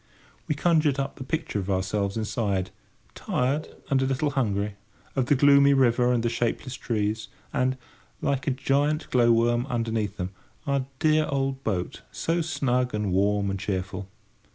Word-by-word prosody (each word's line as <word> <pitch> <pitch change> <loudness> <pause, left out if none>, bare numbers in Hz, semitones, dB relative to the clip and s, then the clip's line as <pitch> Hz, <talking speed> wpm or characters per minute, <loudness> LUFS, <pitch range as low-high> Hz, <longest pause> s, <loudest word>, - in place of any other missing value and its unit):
We 150 - 0
conjured 155 -3 +3
up 135 0 -3
the - - -6
picture 155 -5 -2
of 95 0 -4
ourselves 100 +2 0
inside, 105 -4 -1 0.4
tired 135 +5 -1 0.2
and 135 -1 +3
a - - +2
little 140 +2 0
hungry; 105 -6 0 0.4
of 130 -3 +1
the 145 - +4
gloomy 140 +1 +6
river 125 -1 +3
and 120 -2 +1
the - - +2
shapeless 120 +2 -2
trees; 110 -3 -2 0.3
and, 130 +1 +1 0.4
like 140 +3 -1
a 130 -2 0
giant 145 +3 +1
glow 120 -2 +5
worm 120 +2 +2
underneath 115 -5 -1
them, 90 +1 -3 0.3
our 140 -2 0
dear 155 +1 +3
old 135 -1 -1
boat, 95 -5 -2
so 170 +1 0
snug 125 -6 0
and 105 -2 -1
warm 100 +1 +2
and 95 - -3
cheerful. 95 0 -3
125 Hz, 160 wpm, -26 LUFS, 105-140 Hz, 0.4 s, gloomy